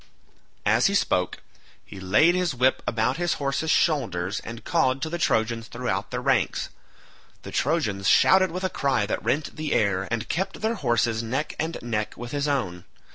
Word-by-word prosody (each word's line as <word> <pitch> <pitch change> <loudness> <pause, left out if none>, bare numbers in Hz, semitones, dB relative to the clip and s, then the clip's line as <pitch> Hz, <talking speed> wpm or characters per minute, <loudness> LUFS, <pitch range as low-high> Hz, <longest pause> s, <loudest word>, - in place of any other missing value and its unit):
As - - +4
he - - 0
spoke - - 0 0.4
he 95 - -10
laid 105 - +4
his 180 -5 0
whip 130 +2 +2
about 115 +3 0
his 175 0 0
horses' 140 +3 -2
shoulders 110 - +1
and 115 +1 -9
called 135 -6 +2
to 160 - -3
the 175 - -3
Trojans 115 -5 0
throughout - - -3
their - - -4
ranks; - - +1 0.7
the - - -8
Trojans 110 - 0
shouted 190 0 +5
with 180 +3 -5
a 185 - +1
cry 135 -7 +1
that 100 - -3
rent 135 +7 -1
the 155 -1 -2
air, 95 -2 +1
and 115 0 -2
kept 190 +3 -3
their 220 +1 +1
horses 120 - 0
neck 130 +7 -3
and 160 +2 -2
neck 110 -3 -3
with 120 0 -7
his 145 0 -1
own. 95 -12 -2
130 Hz, 180 wpm, -25 LUFS, 110-160 Hz, 0.7 s, shouted